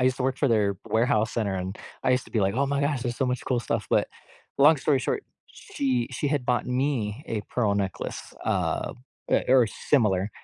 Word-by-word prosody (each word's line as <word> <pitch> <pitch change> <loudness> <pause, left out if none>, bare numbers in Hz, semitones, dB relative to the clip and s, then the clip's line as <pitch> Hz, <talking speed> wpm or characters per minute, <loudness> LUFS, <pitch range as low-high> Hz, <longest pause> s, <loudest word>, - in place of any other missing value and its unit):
I 125 - +3
used 130 0 +2
to - - -1
work 130 0 0
for 140 - +2
their 105 -4 +2
warehouse 110 -1 +1
center 105 -4 -1
and 95 +1 -3 0.3
I - - +3
used 125 0 +2
to - - -15
be 115 - 0
like, 100 +2 +1
"Oh 140 +2 +1
my 140 +1 0
gosh, 145 -2 0
there's 120 -1 -3
so 135 - +1
much 125 0 -1
cool 125 -2 +1
stuff," 105 - -2
but, - - +3 0.5
long 150 +3 +7
story 140 0 +2
short, - - -2 0.2
she 130 -4 -2
she 145 - -1
had 145 -4 0
bought 125 -1 +1
me 125 -1 -1
a 110 -6 -2
pearl 105 -5 +1
necklace, 100 -2 -4
uh, - - 0 0.4
eh - - +3
or 125 -3 +6
similar. 105 -5 +1
125 Hz, 220 wpm, -26 LUFS, 105-135 Hz, 0.5 s, long